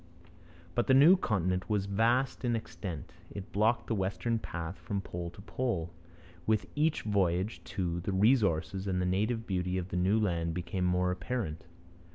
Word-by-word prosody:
But 120 - 0
the 130 - +6
new 150 +8 +8
continent 95 - 0
was 105 -2 +1
vast 115 +8 +1
in 120 -2 +1
extent. 95 -7 -6 0.2
It 100 -1 -8
blocked 110 +3 +2
the - - -1
westward 110 +3 -1
path 85 -1 -5
from 100 -3 -3
pole 85 -2 -5
to 95 - -13
pole. 100 -8 -2 0.5
With 110 -1 +2
each 150 +1 +1
voyage, 95 0 0
too, 85 -2 -2
the 90 +4 -3
resources 95 -3 +2
and 90 -1 0
the 90 - +1
native 110 +5 0
beauty 90 -2 -1
of 90 0 -3
the 90 - -2
new 95 +5 +3
land 85 -5 0
became 90 +1 -2
more 90 0 +2
apparent. 95 -3 -3
95 Hz, 170 wpm, -31 LUFS, 90-110 Hz, 0.5 s, new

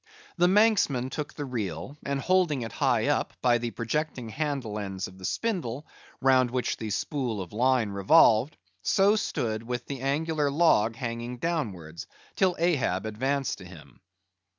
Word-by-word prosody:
The 175 0 +4
Manxman 185 - +3
took 150 +1 -5
the 145 - -4
reel, 105 - -4
and 140 0 -2
holding 170 -5 +2
it 115 - -6
high 125 -6 +1
up, 145 - -1
by 120 -1 +3
the 120 0 -2
projecting 125 +1 -3
handle 135 -5 -3
ends 95 -2 -4
of 95 +1 -14
the 95 - -7
spindle, 155 - -2 0.4
round 130 -2 +4
which 125 0 -1
the 110 - -5
spool 125 -1 -2
of 90 -1 -7
line 125 -2 +2
revolved, 110 +5 +4 0.2
so 200 +2 +3
stood 110 - -2
with 120 +1 -4
the 135 -3 -6
angular 150 +2 0
log 140 -8 +3
hanging 120 0 -4
downwards, 105 - -3 0.3
till 185 -2 +2
Ahab 130 - +1
advanced 135 +5 -1
to 95 - -11
him. 90 -4 -14
125 Hz, 155 wpm, -27 LUFS, 110-150 Hz, 0.4 s, The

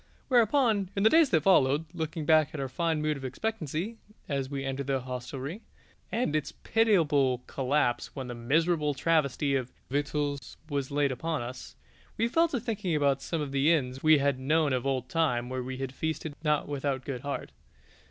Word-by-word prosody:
Whereupon, 230 -5 +3
in 195 - 0
the 220 - +6
days 320 -3 +6
that 160 -3 +2
followed, 150 -5 +4
looking 160 -1 -4
back 155 0 +4
at - - -4
our 135 - -2
fine 160 +3 -1
mood 155 -1 0
of 135 - -10
expectancy 180 - -3 0.3
as 135 -2 -2
we 135 -1 -4
entered 135 0 -3
that 135 -1 0
hostelry, 130 - -6 0.5
and 225 -10 0
its 155 -2 -1
pitiable 150 - +2
collapse 130 -2 0
when 135 -2 -4
the 125 - -5
miserable 150 +5 +1
travesty 140 -2 +1
of 130 -2 -2 0.2
victuals 145 -1 -2
was 140 -3 -2
laid 145 0 +1
before 155 +2 -2
us, 125 +2 -8 0.4
we 230 - +2
fell 330 +8 +3
to 275 -6 -2
thinking 205 -7 -2
about 140 -2 +2
some 165 +1 -2
of 145 -2 -4
the 140 +3 +3
inns 130 -5 0
we 155 -1 +6
had 140 -2 +1
known 150 +1 +2
of 130 +1 -1
old 130 -2 -1
time 125 -6 0
where 130 0 -3
we 130 +1 -5
had 135 0 -4
feasted 160 +1 -3
not 150 -1 +1
without 140 -2 -2
good 130 -4 -4
heart. 140 0 -4
145 Hz, 185 wpm, -29 LUFS, 135-165 Hz, 0.5 s, the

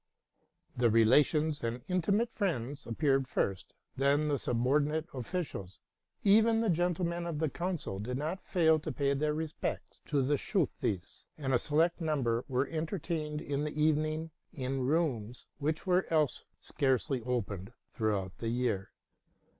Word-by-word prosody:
The 120 -1 +3
relations 145 +7 +4
and 120 +1 -3
intimate 195 +6 +1
friends 145 - -2
appeared 135 +2 +1
first, 95 -6 -2 0.2
then 140 +3 +2
the 140 -2 +1
subordinate 145 +7 +1
officials; 125 - -4 0.4
even 225 +3 +5
the 225 -4 +2
gen 175 +1 +1
tlemen 170 0 -2
of 160 - -3
the 155 0 0
council 170 - -3
did 125 +5 -3
not 160 +7 -3
fail 160 -4 +3
to - - -4
pay 140 -2 +1
their 150 +2 0
respects 160 0 -4
to 145 -2 +2
the 145 +2 +2
Schultheiss, 125 - -2
and 135 -3 -1
a 125 - +4
select 165 +6 +1
number 130 -7 0
were 130 0 +1
entertained 155 -1 -3
in 140 0 -2
the 150 0 -4
evening 155 +1 +1 0.2
in 135 -4 -3
rooms 125 -7 0
which 155 +2 -1
were 185 0 +2
else 155 -4 +1
scarcely 130 0 0
opened 110 -5 -3 0.2
throughout 100 -4 -1
the 115 - -2
year. 115 -5 -1
145 Hz, 145 wpm, -32 LUFS, 125-160 Hz, 0.4 s, even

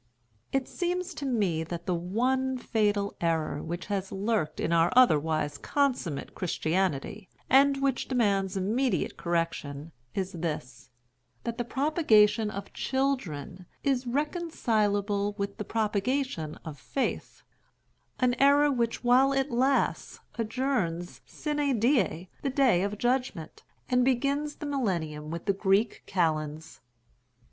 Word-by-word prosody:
It 270 -1 0
seems 360 +1 -2
to 290 -2 -4
me 195 -10 +1
that 170 +1 -6
the 180 - 0
one 255 +9 0
fatal 205 -4 0
error 160 -3 0
which 175 +2 -5
has 195 -2 -3
lurked 200 -5 -1
in 170 - 0
our 165 +1 +4
otherwise 155 - +3
consummate 255 - -1
Christianity, 180 +2 -1 0.2
and 275 +1 +5
which 270 -2 0
demands 200 -6 +1
immediate 230 +7 0
correction 165 -3 -2 0.2
is 190 -1 -2
this, 145 -7 -5 0.5
that 235 +1 -4
the - - +1
propagation 230 -6 +3
of 200 -1 -7
children 190 - -2 0.2
is 260 -2 +1
reconcileable 215 - 0
with 200 -1 -3
the - - -3
propagation 215 - -1
of 155 -3 -7
the - - -21
faith—an 255 -1 -4
error 285 +1 +5
which 235 -3 -1
while 255 +3 +5
it 270 0 0
lasts 260 +3 +1
adjourns 225 -8 -2
sine 295 -5 -1
die 205 - +2
the 275 - -1
day 255 -9 +3
of 200 +2 -2
judgment, 245 -9 -1 0.3
and 250 -1 +3
begins 280 +4 0
the - - -7
Millennium 170 - -2
with 170 +1 -5
the 200 - +2
Greek 200 +3 +1
Kalends. 160 -3 -1
210 Hz, 125 wpm, -28 LUFS, 175-265 Hz, 0.5 s, and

